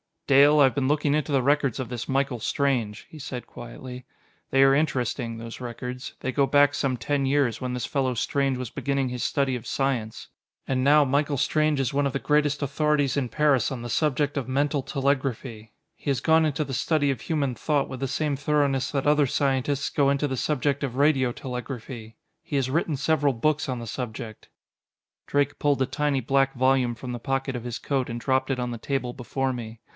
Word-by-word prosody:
"Dale, 145 +2 +6
I - - +8
have 130 -3 +4
been 135 -2 +1
looking 145 0 +2
into 150 0 0
the 135 -2 +3
records 140 -2 +2
of 130 -4 -4
this 120 -2 -5
Michael 135 -2 0
Strange," 120 -4 -1
he 155 - -11
said 130 -3 -6
quietly. 125 +1 -9 0.4
"They 135 0 +4
are 135 0 +6
interesting, 130 -5 -1
those 115 0 -8
records. 125 +1 -6
They 130 - -2
go 140 +1 +2
back 145 0 +4
some 135 -3 0
ten 140 +2 -1
years, 135 -4 +1
when 125 -1 -3
this 125 -2 -2
fellow 130 -2 0
Strange 135 +2 0
was 125 -2 -5
beginning 140 0 -1
his 125 -1 -4
study 140 -2 0
of 115 - -11
science. 125 -5 -2 0.4
And 130 -1 0
now 150 +1 +6
Michael 145 +1 +1
Strange 155 +2 +1
is 130 -1 -1
one 140 0 +2
of 135 - -4
the - - +1
greatest 150 0 +1
authorities 145 0 +1
in 135 -3 0
Paris 145 -4 +2
on 125 - -6
the 120 - -6
subject 145 +2 0
of 130 -4 -2
mental 140 +2 0
telegraphy. 130 -5 -2 0.2
He - - -5
has 135 - 0
gone 160 0 +4
into 155 0 0
the 135 -2 -6
study 145 +3 +1
of 130 - -5
human 145 -6 -1
thought 145 +4 0
with 130 - -6
the 135 - -1
same 145 +1 -1
thoroughness 145 -2 +1
that 140 -2 -1
other 150 -1 +4
scientists 135 +1 0
go 140 -2 +2
into 140 +1 +1
the 130 - -2
subject 140 +2 0
of 130 -3 -3
radio 135 -3 +3
telegraphy. 125 -3 -7 0.3
He - - -6
has 130 -2 0
written 160 0 0
several 145 0 +1
books 150 +5 0
on 130 -2 -3
the 115 - -6
subject." 110 -1 -6 0.8
Drake 145 0 0
pulled 145 -2 +1
a - - +4
tiny 145 0 0
black 135 +2 +1
volume 130 -1 +2
from 125 +2 -7
the 120 - -4
pocket 135 +2 -2
of 120 -1 -5
his 120 -1 -4
coat 135 -2 -2
and 120 0 -4
dropped 130 +2 0
it 135 -2 -1
on 125 0 -2
the 120 - -4
table 130 -1 -2
before 130 +2 -2
me. 115 -2 -7
135 Hz, 210 wpm, -25 LUFS, 125-145 Hz, 0.8 s, I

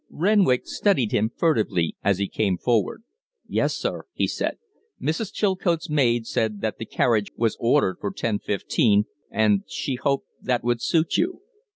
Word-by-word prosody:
Renwick 185 -8 +3
studied 135 - +1
him 110 +2 +2
furtively 110 - +1
as 100 -2 +2
he 100 0 -1
came 95 -3 0
forward. 115 - 0 0.4
"Yes, - - 0
sir," - - -3
he - - +1
said. - - -2 0.4
"Mrs. 190 +6 -2
Chilcote's 180 -5 0
maid 120 -6 +2
said 110 -2 -1
that 110 -1 -2
the 110 - -5
carriage 110 -4 +1
was 115 -1 +1
ordered 120 -5 +2
for 100 - -1
ten 110 -3 -2
fifteen, 105 +1 +2 0.2
and 105 -3 +2
she 135 - -3
hoped 140 +2 0 0.2
that 125 -2 0
would 120 -1 0
suit 165 -1 +1
you." 360 +2 -1
120 Hz, 160 wpm, -24 LUFS, 105-155 Hz, 0.4 s, Renwick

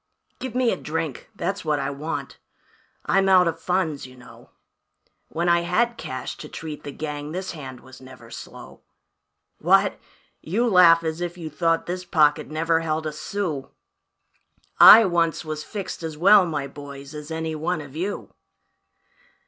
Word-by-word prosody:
"Give 260 -2 -6
me 250 -2 +2
a - - -2
drink 160 -3 -4
that's 200 0 -3
what 155 -2 0
I 140 0 -2
want 150 +4 -5 0.7
I'm 195 0 +2
out 185 -2 +6
of 165 0 -2
funds, 165 -6 -1
you 130 - -15
know, 125 - -16 0.8
When 170 +2 -2
I 170 0 +4
had 220 +8 0
cash 130 - -6
to - - -9
treat 155 -2 -7
the 145 - -6
gang 150 +1 -6
this 185 +1 -4
hand 130 -6 -9
was 130 0 -15
never 130 0 -14
slow. - - -11 0.8
What? - - +3 0.4
You 225 +9 0
laugh 175 -5 +6
as 160 +1 -3
if 175 0 -4
you 160 -3 -7
thought 165 +1 0
this 180 +1 -4
pocket 155 -5 +2
never 165 +1 +1
held 160 -1 -2
a 155 - -2
sou; 150 -3 -4 1.1
I 225 0 +10
once 170 -2 0
was 155 -1 -5
fixed 195 -5 -6
as 160 -2 -6
well, 195 +2 +6
my 150 -4 -3
boys, 140 0 -10
as 150 0 -8
any 160 0 -3
one 165 +3 -2
of 145 -2 -10
you. 190 +5 -4
165 Hz, 165 wpm, -23 LUFS, 150-180 Hz, 1.1 s, I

